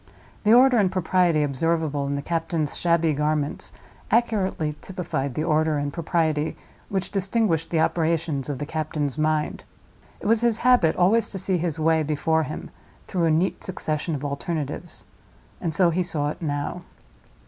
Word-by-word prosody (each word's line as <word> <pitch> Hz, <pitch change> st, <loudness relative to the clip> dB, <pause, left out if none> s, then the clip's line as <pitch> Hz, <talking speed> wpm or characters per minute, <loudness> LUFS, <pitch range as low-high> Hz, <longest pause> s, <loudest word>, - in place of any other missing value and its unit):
The 210 Hz, -, +4 dB
order 250 Hz, 0 st, +6 dB
and 190 Hz, -3 st, +2 dB
propriety 180 Hz, -3 st, +2 dB
observable 145 Hz, 0 st, 0 dB
in 140 Hz, -, -1 dB
the 140 Hz, -, -3 dB
captain's 165 Hz, -2 st, -1 dB
shabby 170 Hz, -2 st, +2 dB
garments 150 Hz, 0 st, -1 dB, 0.4 s
accurately 190 Hz, -10 st, +1 dB
typified 140 Hz, -8 st, -3 dB
the 155 Hz, -, -1 dB
order 155 Hz, -1 st, +2 dB
and 145 Hz, 0 st, -2 dB
propriety 160 Hz, -2 st, 0 dB, 0.3 s
which 190 Hz, -2 st, -2 dB
distinguished 195 Hz, -4 st, 0 dB
the 165 Hz, -2 st, +1 dB
operations 160 Hz, -5 st, 0 dB
of 140 Hz, -, -2 dB
the 145 Hz, -, -4 dB
captain's 155 Hz, -2 st, -3 dB
mind. 155 Hz, 0 st, 0 dB, 0.6 s
It -, -, -11 dB
was 225 Hz, +2 st, +3 dB
his 235 Hz, -2 st, +2 dB
habit 245 Hz, -11 st, +5 dB
always 205 Hz, +6 st, +3 dB
to 195 Hz, -, -5 dB
see 185 Hz, -1 st, 0 dB
his 165 Hz, -2 st, -2 dB
way 160 Hz, 0 st, +3 dB
before 155 Hz, +2 st, +1 dB
him 155 Hz, -, -6 dB, 0.3 s
through 175 Hz, -3 st, 0 dB
a -, -, +3 dB
neat 165 Hz, +4 st, +1 dB
succession 155 Hz, -3 st, -3 dB
of 145 Hz, +1 st, -5 dB
alternatives—and 155 Hz, +3 st, -5 dB
so 170 Hz, +2 st, +3 dB
he 180 Hz, +3 st, 0 dB
saw 155 Hz, -4 st, -1 dB
it -, -, -10 dB
now. 145 Hz, +3 st, -3 dB
160 Hz, 160 wpm, -24 LUFS, 150-180 Hz, 0.6 s, order